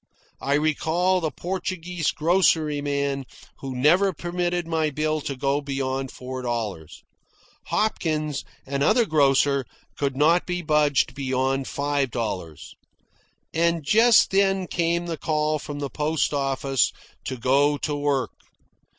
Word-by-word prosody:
I 140 - +1
recall 160 +5 +1
the 160 - 0
Portuguese 180 +1 -3
groceryman 145 -5 +1 0.4
who 135 -2 -6
never 175 +10 +4
permitted 175 +1 -2
my 160 -2 0
bill 155 +1 -1
to 140 - -4
go 140 +2 0
beyond 135 -1 -3
four 130 +1 -7
dollars. 110 -10 -4 0.6
Hopkins, 155 -9 -1 0.2
another 140 - +2
grocer, 140 -4 +3 0.3
could 140 -2 -2
not 165 +5 +3
be 180 -1 -2
budged 150 -3 +2
beyond 135 0 -1
five 145 -1 -1
dollars. 95 - -5 0.8
And 170 0 +1
just 225 +9 +5
then 195 -1 +2
came 170 0 0
the 165 -2 -4
call 155 0 0
from 145 0 -7
the 140 -1 -3
post 150 0 0
office 135 -2 +1 0.3
to 130 - -4
go 140 +4 +2
to 150 0 -2
work. 145 -2 0
145 Hz, 125 wpm, -24 LUFS, 135-170 Hz, 0.8 s, just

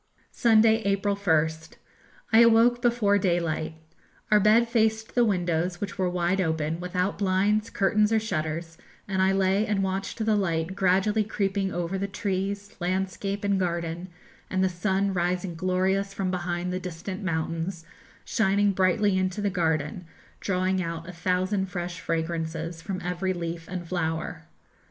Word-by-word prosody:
Sunday, 225 -1 +4
April 200 0 +1
1st. 160 -4 0 0.6
I 225 - +8
awoke 235 +1 +5
before 230 -4 +3
daylight. 170 -4 -1 0.6
Our 210 - +7
bed 215 +3 +5
faced 220 -1 +1
the 245 - +4
windows, 175 -4 0
which 200 -1 -5
were 185 -1 +2
wide 180 +2 0
open, 160 -1 -1
without 180 +2 -2
blinds, 205 +3 +1
curtains, 210 +2 +2
or 225 - +4
shutters, 165 -4 -3 0.3
and 190 -2 0
I 190 0 +4
lay 195 +1 +2
and 205 -2 +1
watched 190 +1 -3
the 220 -1 +3
light 170 -2 -1
gradually 195 +3 +2
creeping 195 -2 -1
over 175 +2 -2
the 200 - -1
trees, 200 0 -3
landscape, 190 +2 -2
and 200 -1 +1
garden, 170 -1 -2 0.4
and 185 0 +1
the 190 - +3
sun 190 +2 0
rising 180 0 -1
glorious 190 +3 0
from 190 -2 -1
behind 180 0 -2
the 185 - -1
distant 185 +2 -6
mountains, 165 0 -2 0.4
shining 200 -1 +2
brightly 190 +1 +2
into 185 +1 -1
the 205 -1 0
garden, 160 -1 -1 0.3
drawing 185 0 0
out 165 -1 -5
a - - -6
thousand 185 +3 0
fresh 175 -1 -5
fragrances 165 0 -3
from 185 +2 -4
every 180 +2 -1
leaf 170 -2 -5
and 180 -2 -5
flower. 160 -1 -3
185 Hz, 150 wpm, -26 LUFS, 170-200 Hz, 0.6 s, I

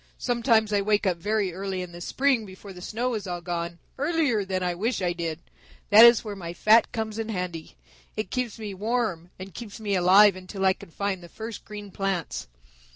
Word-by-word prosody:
Sometimes 230 -3 +2
I 200 - +3
wake 210 +1 +1
up 180 -3 +1
very 205 0 -1
early 190 0 -3
in 180 - -9
the 175 0 -10
spring 260 +4 +1
before 195 0 -11
the 180 - -11
snow 240 +6 -2
is 210 -3 -4
all 175 -1 -3
gone, 170 -1 -4 0.2
earlier 290 -8 +1
than 185 -1 -2
I 180 -1 0
wish 220 +8 -1
I 180 -2 0
did. 165 -2 -3 0.5
That 220 +3 +10
is 235 -1 +6
where 210 -2 -5
my 170 -3 -6
fat 215 +6 +4
comes 220 -1 -4
in 225 0 -3
handy. 180 -5 -5 0.4
It 215 - -3
keeps 250 -4 -2
me 210 -3 -6
warm 205 -4 -2
and 190 0 -9
keeps 225 +2 -8
me 210 -2 -2
alive 190 +2 +6
until 185 +1 -4
I 190 - +5
can - - -14
find 195 +2 -3
the 175 - -12
first 220 +3 -7
green 205 -1 -9
plants. 195 - -3
200 Hz, 210 wpm, -26 LUFS, 180-220 Hz, 0.5 s, That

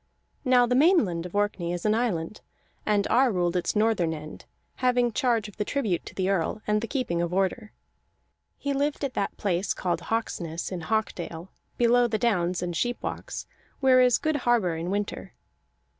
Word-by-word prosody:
Now 250 -2 +5
the 245 - 0
Mainland 250 - +3
of 180 - -12
Orkney 205 -4 0
is 175 +2 -5
an 215 - +4
island, 215 -6 -1 0.5
and 205 -1 +2
Ar 255 +2 +3
ruled 175 -2 0
its 180 - 0
northern 210 -7 +2
end, 155 0 -10 0.3
having 245 -1 +2
charge 230 -3 +1
of 210 - -14
the - - 0
tribute 210 -8 -1
to - - -10
the 190 -1 0
Earl 195 +1 0
and 210 0 +1
the 230 - -3
keeping 235 -12 -1
of 170 0 -1
order. 195 +3 -1 0.9
He 280 - -2
lived 285 +2 -1
at 275 -2 -2
that 200 - -2
place 190 -1 0
called 175 -2 -1
Hawksness 175 -6 -3
in 180 -2 -4
Hawkdale, 175 -4 -3 0.3
below 240 0 +4
the 220 -2 -1
downs 180 -6 0
and 175 -1 -3
sheepwalks, 245 +6 -3 0.3
where 260 -2 +5
is 250 -2 +5
good 310 -1 0
harbor 235 - +2
in 165 +2 -4
winter. 205 +1 -3
210 Hz, 175 wpm, -26 LUFS, 175-245 Hz, 0.9 s, Now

